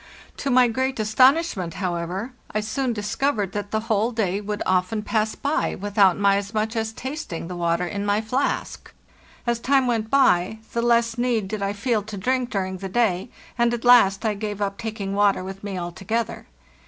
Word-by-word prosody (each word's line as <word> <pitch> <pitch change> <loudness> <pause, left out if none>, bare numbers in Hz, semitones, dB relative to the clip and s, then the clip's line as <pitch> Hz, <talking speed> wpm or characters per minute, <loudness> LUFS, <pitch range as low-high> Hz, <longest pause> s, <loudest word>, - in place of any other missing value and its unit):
To 280 - -2
my 250 -1 +5
great 260 +2 -1
astonishment, 220 - +3
however, 185 +5 -3 0.2
I 215 - -1
soon 245 +4 -1
discovered 210 -1 -1
that 205 0 -4
the 220 +1 -1
whole 225 +1 +1
day 205 -4 -1
would 210 0 -3
often 185 +3 +1
pass 215 0 0
by 290 +2 -1
without 200 -2 +3
my 200 0 +3
as 200 +2 -5
much 220 +2 -1
as 220 -1 -1
tasting 260 - -6
the 180 - -6
water 170 0 0
in 200 +3 -3
my 205 0 +1
flask. 250 +6 -2 0.5
As 235 -1 0
time 270 +2 +3
went 225 -3 0
by, 220 -7 +3 0.2
the 235 - 0
less 235 0 +2
need 240 -5 +1
did 210 +1 -4
I 200 0 -1
feel 215 +1 0
to 210 0 -8
drink 250 +4 0
during 190 -3 -2
the 195 +1 -6
day, 200 -2 +1 0.3
and 235 0 +3
at 235 - -7
last 230 -4 +6
I 215 - +2
gave 205 0 -5
up 200 -1 -2
taking 215 -3 -4
water 200 -2 +2
with 195 +1 -8
me 200 -2 -4
altogether. 195 +6 -3
215 Hz, 190 wpm, -23 LUFS, 195-235 Hz, 0.5 s, last